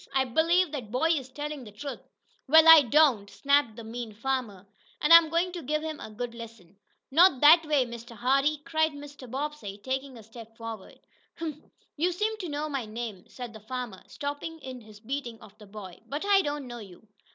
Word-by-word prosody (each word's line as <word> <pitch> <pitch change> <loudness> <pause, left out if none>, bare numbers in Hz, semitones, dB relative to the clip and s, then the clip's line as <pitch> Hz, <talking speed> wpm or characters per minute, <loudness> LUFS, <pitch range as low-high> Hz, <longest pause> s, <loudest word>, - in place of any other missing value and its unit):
"I 265 0 +3
believe 330 +6 +2
that 260 -8 -6
boy 260 +8 +1
is 270 -6 -1
telling 295 0 -6
the 210 - -11
truth!" 270 +7 -7 0.5
"Wa'al, 320 +2 +7
I 325 -1 +11
don't," 260 -6 +3
snapped 280 -4 +1
the 230 - -9
mean 225 0 -7
farmer. 230 -5 -3 0.3
"An' 300 - +1
I'm 335 -1 +9
goin' 340 +3 0
to 350 -1 -6
give 305 +2 -2
him 315 -1 -5
a - - -8
good 235 +2 -6
lesson." 225 -6 -12 0.4
"Not 320 -2 +5
that 320 +2 +7
way, 290 -4 +2
Mr. 235 0 -10
Hardee!" 275 +5 +1
cried 315 -1 +1
Mr. 285 -3 -11
Bobbsey, 275 -6 -5
taking 265 +3 -4
a 225 - -12
step 225 0 -13
forward. 225 -4 -9 0.4
"Huh! 330 -1 -3 0.5
You 345 +4 +1
seem 425 +5 -1
to 360 -5 -5
know 295 +1 -3
my 275 -6 -4
name," 215 -4 -6
said 245 -3 -9
the 220 - -10
farmer, 235 -2 -6
stopping 290 +3 -5
in 255 -2 -8
his 215 -1 -15
beating 240 0 -5
of 210 -1 -16
the 210 - -14
boy, 195 -3 -10
"but 290 +8 -4
I 400 -1 +5
don't 290 -4 -4
know 240 -1 -8
you." 200 0 -13
265 Hz, 200 wpm, -28 LUFS, 225-305 Hz, 0.5 s, I